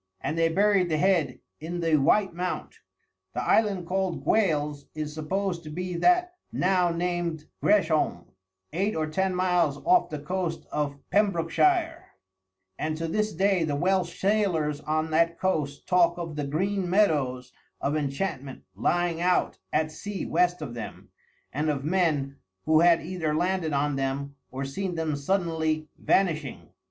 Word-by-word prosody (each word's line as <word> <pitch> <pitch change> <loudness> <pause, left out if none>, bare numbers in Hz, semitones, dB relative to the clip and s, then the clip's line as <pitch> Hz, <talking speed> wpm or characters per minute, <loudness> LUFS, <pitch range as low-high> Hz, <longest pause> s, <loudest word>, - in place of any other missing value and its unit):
And 150 +4 -3
they 165 0 +3
buried 195 +1 +3
the 155 - +1
head 165 -6 +1 0.2
in 170 +3 -5
the 165 -2 +2
White 190 +7 +3
Mount. 180 +1 -4 0.6
The - - -1
island 200 -5 +2
called 185 0 -1
Gwales 150 -9 +1
is 155 -1 -4
supposed 175 +3 -2
to 155 - -8
be 180 +3 -4
that 355 - +3 0.2
now 180 -1 +2
named 170 -2 -2 0.2
Gresholm, 160 - +2 0.5
eight 195 +6 0
or 155 - 0
ten 185 +4 -1
miles 180 -5 +2
off 360 0 +4
the 155 - -4
coast 165 +2 -3
of 145 -1 -2
Pembrokeshire; 320 - +1 0.7
and 155 0 -2
to 165 0 -3
this 215 +5 0
day 195 -3 +2
the 150 -3 -1
Welsh 180 +2 0
sailors 185 -8 +1
on 155 +1 -1
that 165 +1 +2
coast 150 -7 -1
talk 175 -1 +3
of 165 -3 -5
the 145 -1 -3
Green 185 +5 -1
Meadows 140 -10 +1 0.3
of 145 +2 -1
Enchantment 140 -2 -3
lying 170 - 0
out 180 0 +1
at 155 0 +1
sea 205 +4 -5
west 175 -1 +1
of 125 -5 -6
them, 115 -3 -8 0.4
and 150 +3 0
of 140 -2 -2
men 155 -6 +1 0.3
who 155 0 +5
had 170 0 +5
either 165 -4 -2
landed 175 -1 0
on 145 0 0
them 135 +1 -2
or 135 +1 -4
seen 180 +6 -3
them 160 -2 -1
suddenly 160 -1 -1
vanishing. 155 -8 0
165 Hz, 150 wpm, -27 LUFS, 150-185 Hz, 0.7 s, who